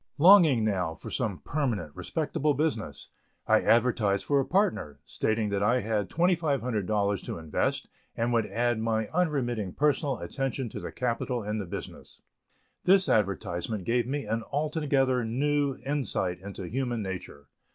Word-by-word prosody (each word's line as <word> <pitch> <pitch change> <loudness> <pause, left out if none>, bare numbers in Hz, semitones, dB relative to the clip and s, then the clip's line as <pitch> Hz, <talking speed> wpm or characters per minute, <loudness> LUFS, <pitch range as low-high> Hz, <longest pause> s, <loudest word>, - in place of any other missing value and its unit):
Longing 160 - +7
now 90 -6 0
for 80 - -9
some 105 - -2
permanent 115 - -2
respectable 150 -2 -1
business, 125 - -2 0.4
I - - +4
advertised 115 -4 +2
for 140 -1 +3
a 135 - +1
partner, 185 - 0
stating 110 -1 -1
that 100 -1 -1
I 120 +5 +3
had 105 -2 -1
$2,500 120 - 0
to - - -4
invest 80 -2 -1 0.3
and 120 +1 0
would 115 -2 +2
add 120 -1 0
my 110 -1 -1
unremitting 125 - -1
personal 145 -2 +1
attention 135 -2 -3
to - - -7
the - - -6
capital 120 -1 -2
and 105 +1 -2
the 95 - -6
business. - - -8 0.6
This 190 +1 +5
advertisement 100 -1 0
gave 120 +3 +1
me 140 -1 -2
an 115 +2 -1
altogether 140 -4 +1
new 140 +4 0
insight 110 -10 -1
into 100 0 -8
human 120 0 -2
nature. 90 -7 -7
120 Hz, 145 wpm, -28 LUFS, 105-140 Hz, 0.6 s, Longing